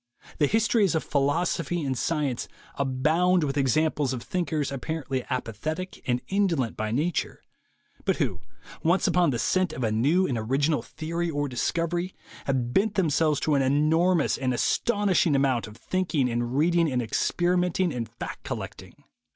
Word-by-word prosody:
The 145 - +4
histories 215 -3 +2
of 160 - 0
philosophy 165 +3 0
and 135 -1 -1
science 145 -2 -1 0.3
abound 155 +7 +2
with 140 -2 -1
examples 145 0 +1
of 120 -2 -5
thinkers 160 -6 -2
apparently 135 -1 -3
apathetic 155 - -4
and 125 -1 +1
in 200 +1 +2
dolent 135 - -1
by 110 0 -2
nature, 150 +9 -1 0.6
but - - +1
who, - - -2 0.4
once 170 +4 +2
upon 180 -2 +3
the 125 - 0
scent 185 +9 +1
of 130 - -4
a 110 - +1
new 145 +12 +3
and 125 -9 -1
original 140 +7 +1
theory 170 +2 -4
or 145 -2 -1
discovery, 170 +7 -1 0.3
have 125 -3 -1
bent 210 +1 +2
themselves 155 -4 +2
to 155 - +1
an 140 - +3
enormous 155 +5 +2
and 130 -2 0
astounding 195 - +2
amount 135 -4 +1
of 105 +1 -12
thinking 160 -1 0
and 120 +2 -1
reading 165 0 +3
and 125 -1 0
experimenting 180 +7 +1
and 115 -2 -4
fact - - -7
collecting. - - -7
150 Hz, 155 wpm, -26 LUFS, 130-175 Hz, 0.6 s, The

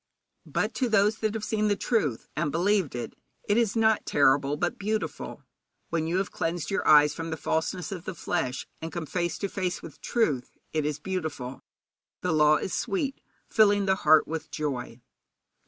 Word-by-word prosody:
But - - -1
to 255 -3 +1
those 210 0 +3
that 215 0 -1
have 220 - -3
seen 215 -1 0
the 205 - +2
truth, 175 - 0
and 150 -1 0
believed 180 -3 +1
it, 120 -1 -4 0.3
it 205 - +3
is 230 -3 +2
not 220 -1 +3
terrible, 140 +1 +3
but 175 - -1
beautiful. 215 +2 -3 0.5
When 160 -1 -1
you 170 +2 0
have 195 - -1
cleansed 165 0 -2
your 195 - 0
eyes 150 -1 +7
from 165 +1 -5
the 160 - -3
falseness 160 +6 -2
of 180 -3 -6
the - - -5
flesh, 150 -6 -2 0.2
and 160 0 -5
come 170 -2 -4
face 175 +2 -2
to 200 - -2
face 185 -2 -3
with 165 - -11
truth, 150 - 0 0.2
it 155 -2 +1
is 150 -1 -2
beautiful. 155 -7 -4 0.6
'The 180 -3 0
law 150 0 +5
is - - -4
sweet, 265 +6 -1 0.3
filling 205 -2 +4
the 190 0 +2
heart 155 -3 +5
with 160 0 -4
joy.' 125 -5 -4
170 Hz, 185 wpm, -27 LUFS, 150-205 Hz, 0.6 s, eyes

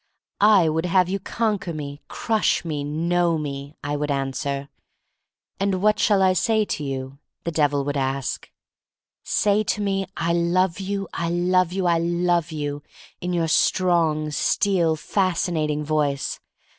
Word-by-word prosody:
"I 205 -5 +6
would 160 +2 0
have 180 0 +3
you 195 +1 -1
conquer 205 -3 -2
me^ 145 -2 -6
crush 220 -5 0
me, 150 -3 -3
know 170 +3 +1
me," 140 -1 -6
I 145 +1 -2
would 150 0 -2
answer. 140 0 -2 0.9
"What 200 +2 +2
shall 200 -3 +3
I 185 -1 +4
say 215 +4 +2
to 150 - -3
you?" 135 0 -5 0.2
the 170 - -2
Devil 145 -3 +1
would 145 0 -2
ask. 135 -1 -2 0.7
"Say 210 +1 +2
to 210 - -1
me, 195 -2 -1
'I 170 0 0
love 170 +1 +1
you, 195 0 -3
I 170 0 -2
love 180 +1 +2
you, 190 0 -2
I 170 -1 +3
love 170 -1 +1
you,' 145 -2 -4 0.4
in 180 - -3
your 170 -2 0
strong, 160 -2 +2
steel, 170 +1 +2
fascinat 170 -2 0
ing 150 0 -1
voice. 145 -2 -1
170 Hz, 150 wpm, -23 LUFS, 150-185 Hz, 0.9 s, I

